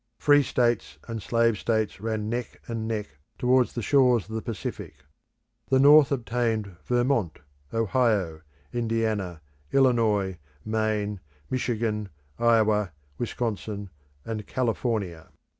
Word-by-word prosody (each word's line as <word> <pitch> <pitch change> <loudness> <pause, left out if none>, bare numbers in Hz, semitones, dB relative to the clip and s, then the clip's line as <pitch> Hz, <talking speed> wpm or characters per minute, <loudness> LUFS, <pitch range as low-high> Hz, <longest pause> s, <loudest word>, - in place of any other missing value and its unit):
Free 145 0 +5
states 120 -4 0
and 115 -2 -4
slave 115 -1 +2
states 110 -4 -1
ran 110 -1 -2
neck 120 +1 -4
and 115 -1 -3
neck 105 -9 -4 0.2
towards 125 0 +3
the 120 - -3
shores 125 -6 +4
of 110 - -9
the 110 - -2
Pacific. 115 -2 -5 0.7
The 130 - +4
North 145 +1 +7
obtained 115 -6 -1
Vermont, 120 - +1 0.3
Ohio, 110 -7 +1 0.3
Indiana, 110 -7 -1 0.3
Illinois, 110 -8 +2 0.3
Maine, 110 -2 -1 0.3
Michigan, 110 -4 -1 0.3
Iowa, 110 -5 +3 0.3
Wisconsin, 105 -4 -3 0.3
and 110 -2 -5
California. 110 -9 -2
115 Hz, 110 wpm, -26 LUFS, 105-120 Hz, 0.7 s, North